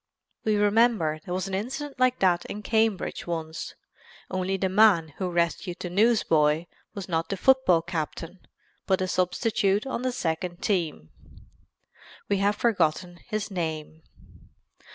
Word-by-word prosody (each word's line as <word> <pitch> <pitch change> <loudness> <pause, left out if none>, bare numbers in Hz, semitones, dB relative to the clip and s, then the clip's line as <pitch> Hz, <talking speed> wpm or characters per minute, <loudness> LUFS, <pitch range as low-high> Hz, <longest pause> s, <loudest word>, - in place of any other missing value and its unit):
We 215 -1 +2
remember 205 -6 +2
there 180 - -4
was 185 +1 -2
an 195 - -6
incident 265 +8 -4
like 255 0 +3
that 180 -2 +3
in 210 - -7
Cambridge 220 -5 0
once, 160 -1 -5 0.6
only 185 +1 -1
the 190 - 0
man 190 -4 +4
who 185 -2 -1
rescued 175 +1 -1
the 175 - -5
newsboy 170 -7 +3 0.3
was 200 -2 -6
not 165 -2 -1
the 195 - -2
football 185 -8 +4
captain 170 +1 -5 0.5
but 190 - +2
a 185 - 0
substitute 195 +3 +1
on 265 -3 -3
the 255 0 0
second 175 -5 -3
team. 160 - -1 1.2
We 200 - +1
have 200 +1 +2
forgotten 175 -5 0
his 215 -2 -3
name. 160 -3 -4
185 Hz, 140 wpm, -26 LUFS, 170-215 Hz, 1.2 s, man